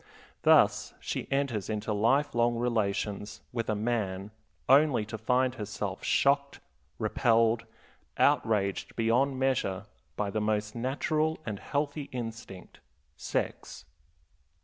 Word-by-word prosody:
Thus - - +4
she - - -4
enters 135 -7 -1
into 105 0 -2
life 120 +8 +2
long 120 0 +2
relations 105 -3 -1
with 115 -2 -2
a 110 - +1
man 105 -3 -2 0.4
only 140 -5 +5
to 110 +1 -6
find 125 +3 +1
herself 105 -4 -5
shocked, 140 0 +2 0.4
repelled, 115 0 +2 0.5
outraged 100 -3 +1
beyond 125 +4 +2
measure 125 -8 0 0.3
by 100 -1 -2
the 110 - -1
most 105 0 -1
natural 155 +6 0
and 105 -4 -4
healthy 145 0 -3
instinct, 115 -6 -7 0.4
sex. - - -4
115 Hz, 110 wpm, -29 LUFS, 105-130 Hz, 0.5 s, only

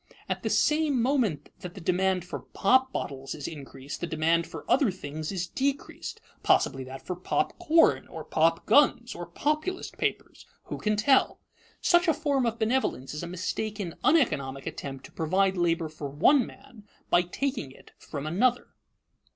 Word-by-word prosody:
At - - -2
the - - -2
same 300 -3 +2
moment 230 - 0
that 180 -2 -8
the - - -7
demand 185 +1 +1
for 180 - -5
pop 260 +5 +2
bottles 135 - -4
is 145 - -5
increased, 140 -2 -8
the 175 - -2
demand 165 +1 +1
for - - -9
other 270 -3 +4
things 155 -3 -5
is 180 -3 -2
decreased, 275 +9 -3 0.2
possibly 135 0 +2
that 130 +1 -9
for 180 - -3
pop 180 - -1
corn 325 +1 +4
or - - -8
pop 165 +1 +1
guns 240 0 +4
or 175 -1 -7
Populist 305 - -2
papers - - -3 0.2
who - - -6
can 215 0 +1
tell? 260 +6 +3 0.4
Such 345 +1 +4
a 325 - +4
form 285 -5 +1
of 230 0 -2
benevolence 220 - 0
is 150 - -4
a 170 - -5
mistaken, 185 +1 -3
uneconomic 145 - +2
attempt 135 -1 -6
to - - -13
provide 190 +4 +1
labor 170 -2 +1
for 155 -2 -7
one 230 - +4
man 215 -3 -15 0.3
by 175 - +6
taking 205 - -3
it - - -17
from 145 -2 -6
another. 235 +10 +1
185 Hz, 165 wpm, -28 LUFS, 155-260 Hz, 0.4 s, by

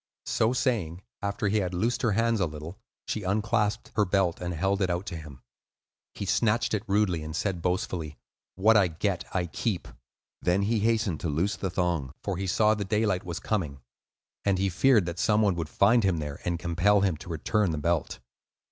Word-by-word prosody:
So 110 - +2
saying, 105 - -1 0.2
after 100 +1 -1
he 105 +2 +2
had 90 -2 -2
loosed 115 +7 0
her 115 -5 +2
hands 115 +1 +2
a 90 - +2
little, 75 +6 -8 0.3
she 110 - -3
unclasped 105 +2 0
her 105 - +4
belt 95 -3 +1
and 90 0 -2
held 95 +4 0
it 95 - +2
out 90 +2 -1
to 90 - -5
him. 75 -4 -10 0.7
He 100 - -4
snatched 115 +4 +1
it 105 - +1
rudely, 100 -5 +1
and 75 0 -6
said 90 -1 -1
boastfully, 90 -4 -2 0.4
"What 110 +4 +4
I 100 -4 +5
get, 90 +3 -2
I 90 -2 +1
keep." 90 +3 -3 0.5
Then 90 +3 +2
he 110 +2 +1
hastened 110 -6 +1
to 85 - -2
loose 85 +8 0
the 95 - -3
thong, 85 -7 -1
for 100 - -2
he 95 0 -3
saw 105 +4 +3
that 100 -3 -4
daylight 105 -4 +1
was 85 -1 -5
coming, 80 -11 -2 0.6
and 100 -2 +2
he 95 +1 +1
feared 110 +2 +4
that 85 0 -5
some 105 0 +3
one 100 -2 +3
would 85 -3 -4
find 110 +7 +4
him 95 -3 +2
there 75 -2 -5
and 85 -1 0
compel 90 +5 +2
him 95 -4 +2
to 90 - -11
return 90 +5 0
the 80 - -2
belt. 85 +1 -1
95 Hz, 200 wpm, -27 LUFS, 85-105 Hz, 0.7 s, I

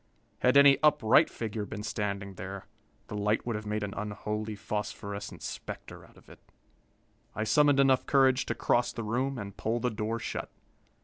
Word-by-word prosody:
Had 125 +2 +4
any 140 -1 +7
upright 150 -7 +5
figure 110 -2 -4
been 105 0 -6
standing 100 -2 -3
there, 95 +1 -7 0.4
the - - -7
light 105 +1 0
would 120 -2 -2
have 105 0 -5
made 105 0 -2
an 100 -1 -4
unholy 105 +1 -4
phosphorescent 100 -1 -5
specter - - -7
out - - -19
of - - -20
it. - - -15 1.0
I 110 - -1
summoned 145 +5 +4
enough 135 -1 +4
courage 135 -2 +3
to - - -1
cross 120 0 +1
the 115 - -5
room 125 +5 -1
and 100 -3 -7
pull 115 +2 -1
the 125 +1 0
door 110 +1 -2
shut. - - -5
110 Hz, 175 wpm, -29 LUFS, 105-125 Hz, 1.0 s, any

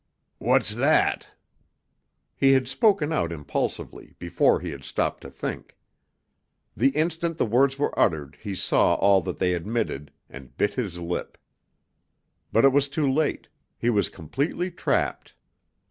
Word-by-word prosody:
"What's - - +2
that?" - - +2 1.1
He 135 0 +4
had 130 -1 +2
spoken 165 - +2
out 85 - 0
impulsively, 75 -3 -4
before - - +2
he 90 -2 -5
had 70 -2 -9
stopped - - -2
to - - -9
think. - - -6 1.0
The 130 +4 +3
instant 165 +1 -1
the - - +1
words 130 +4 +2
were 145 - -1
uttered 75 -3 +1
he 100 -3 -5
saw - - +2
all 100 -1 +4
that - - -5
they 90 -1 +1
admitted, 90 -5 -3 0.2
and 70 -2 -13
bit 105 0 +1
his 100 -9 -4
lip. 85 0 -5 1.1
But 115 - +4
it 135 - +5
was 140 0 +3
too 145 0 0
late; 145 +3 0 0.3
he 120 - +1
was 100 -4 +1
completely 140 - -3
trapped. 170 - -2
120 Hz, 145 wpm, -25 LUFS, 90-145 Hz, 1.1 s, it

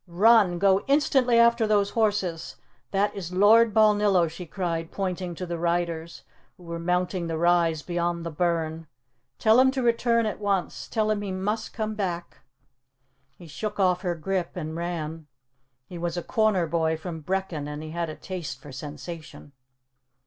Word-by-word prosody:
"Run! 195 0 +4
Go 195 +1 +3
instantly 270 -4 +3
after 235 -1 +4
those 205 -1 +2
horses! 205 -7 -1 0.3
That 200 +1 +1
is 180 -3 -6
Lord 215 +5 +5
Balnillo!" 210 -4 +4
she 170 +2 -8
cried, 165 -2 -3
pointing 185 -2 -3
to 180 - -5
the 170 -1 -4
riders, 170 -1 -2 0.3
who 180 - -17
were 170 0 -6
mounting 180 +1 -1
the 165 -1 -2
rise 170 -2 +2
beyond 175 -1 -2
the 165 - -4
burn. 165 -1 -1 0.5
"Tell 220 +2 +5
him 260 0 +6
to 260 -1 -2
return 235 -1 +2
at 215 - -3
once. 200 -3 -2
Tell 215 -1 0
him 210 -1 -1
he 200 -2 -4
must 210 +4 -2
come 215 -1 -3
back!" 180 -5 -4 1.0
He 175 - -13
shook 210 +7 -5
off 180 -2 +2
her 175 -2 -1
grip 180 +1 -2
and 160 -3 -5
ran. 165 -2 -4 0.6
He 175 +4 -9
was 170 0 -3
a 175 - -3
corner 215 -5 +2
boy 160 -1 0
from 160 0 -7
Brechin 180 -3 -3
and 150 +1 -6
he 155 - -7
had 170 0 -3
a 155 - -6
taste 180 -5 -6
for 145 - -12
sensation. 150 +2 -9
180 Hz, 170 wpm, -26 LUFS, 165-205 Hz, 1.0 s, him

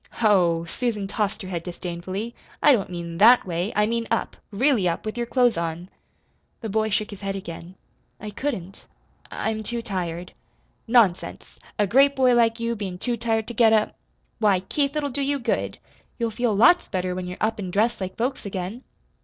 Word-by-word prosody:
"Ho!" 180 -7 +3
Susan 210 +2 -2
tossed 205 0 -2
her - - -7
head 175 -3 -3
disdainfully. 180 +5 -5 0.3
"I 295 - +8
don't 205 -8 +2
mean 170 -1 -6
THAT 235 +4 +7
way. 175 +3 -2
I 210 - +3
mean 230 +1 -1
up 230 - -1
really 220 -2 +2
up 170 - -4
with 215 0 -3
your 240 -1 -2
clothes 245 -4 +3
on." 170 +2 -4 0.7
The 225 - -4
boy 220 +1 +1
shook 215 +1 -1
his 205 - -10
head 195 0 -3
again. 175 -1 -8 0.4
"I 210 0 -7
couldn't. 195 -7 -5 0.4
I 220 - -2
I'm 220 0 -4
too 235 +2 -4
tired." 180 -4 -4 0.5
"Nonsense! 225 -7 +1 0.2
A 210 - +3
great 275 +7 +4
boy 255 -2 +4
like 230 -1 +3
you 230 0 -1
bein' 195 -4 -5
too 240 +6 -1
tired 225 -1 0
to - - -5
get 225 -1 +5
up! 215 -1 +2 0.4
Why 205 -4 +3
Keith, 280 +9 -1
it'll 290 -2 -1
do 280 +3 -1
you 280 +1 +1
good. 245 - -2 0.4
You'll 230 -2 -1
feel 225 -1 0
lots 245 - +5
better 185 -1 -2
when 180 0 -4
you're 180 - -6
up 220 0 0
an' 190 -3 -4
dressed 210 +4 +1
like 185 0 -5
folks 250 +4 -2
again." 195 +5 -5
215 Hz, 195 wpm, -24 LUFS, 185-235 Hz, 0.7 s, I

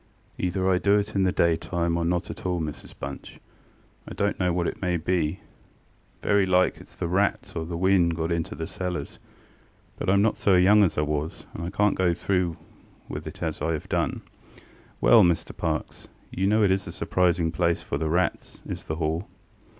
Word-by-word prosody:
ŌĆ£Either 95 +1 0
I 90 - +2
do 100 +1 +4
it 105 0 -2
in 95 -1 +2
the 90 - +2
daytime 85 0 +1
or 85 - 0
not 85 +1 -1
at - - -10
all, 90 -1 -1
Mrs 75 -2 -6
Bunch. 70 0 -8 0.7
I - - -7
donŌĆÖt 100 0 0
know 90 -1 +2
what 85 0 0
it - - -5
may 90 -2 +1
be: 85 0 -1 0.8
very 100 -1 +3
like 90 0 +3
itŌĆÖs - - -15
the - - -2
rats, 95 +4 0
or 80 0 -3
the 85 -1 -4
wind 90 -2 +3
got 80 +1 -2
into 85 -1 -2
the 80 - -4
cellars; 90 -3 -5 0.8
but - - -4
IŌĆÖm 100 +1 +4
not 110 +1 +2
so 100 - +4
young 100 +4 +6
as 90 - +1
I - - +3
was, 75 +1 -3
and 85 - -6
I 85 - -3
canŌĆÖt 105 +1 +2
go 90 -2 +2
through 90 -2 0 0.5
with - - -6
it - - -7
as - - -3
I 80 +2 0
have 75 - -5
done. - - -1 0.3
ŌĆØ - - -21 0.5
ŌĆ£Well, 115 - +9
Mr 85 - -4
Parkes, - - -3 0.2
you 95 +1 0
know 110 +1 +3
it 100 - +4
is 95 +1 0
a - - -5
surprising 85 -1 +1
place 85 +1 0
for - - -3
the 80 - -1
rats, 85 +2 -1
is - - -6
the 80 - -3
Hall. 80 +3 -2
90 Hz, 205 wpm, -26 LUFS, 85-95 Hz, 0.8 s, ŌĆ£Well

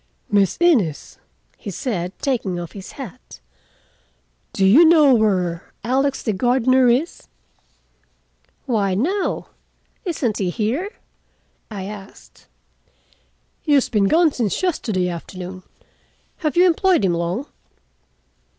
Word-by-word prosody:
"Miss 200 -3 +2
Innes," 240 - +1 0.4
he 215 - -8
said, 185 -3 -3
taking 230 -10 -1
of 175 -1 -6
his 195 -2 -10
hat, 245 - -10 1.1
"do 195 - +1
you 235 - +7
know 315 -4 +6
where 185 -7 0
Alex, 270 +3 0
the 220 - 0
gardener, 250 +4 +3
is?" 270 +8 -1 1.4
"Why, 205 -7 0
no. 365 - -1 0.5
Isn't 275 - -2
he 190 -3 0
here?" 235 - -2 0.8
I 205 -4 -6
asked. 200 0 -11 1.1
"He 300 - 0
has 275 -3 +3
been 210 -4 +2
gone 325 - +4
since 235 - -2
yesterday 215 - 0
afternoon. 180 +2 -7 0.8
Have 310 -1 -2
you 360 - +6
employed 360 - +3
him 180 - +2
long?" 170 +9 -2
225 Hz, 115 wpm, -21 LUFS, 190-285 Hz, 1.4 s, you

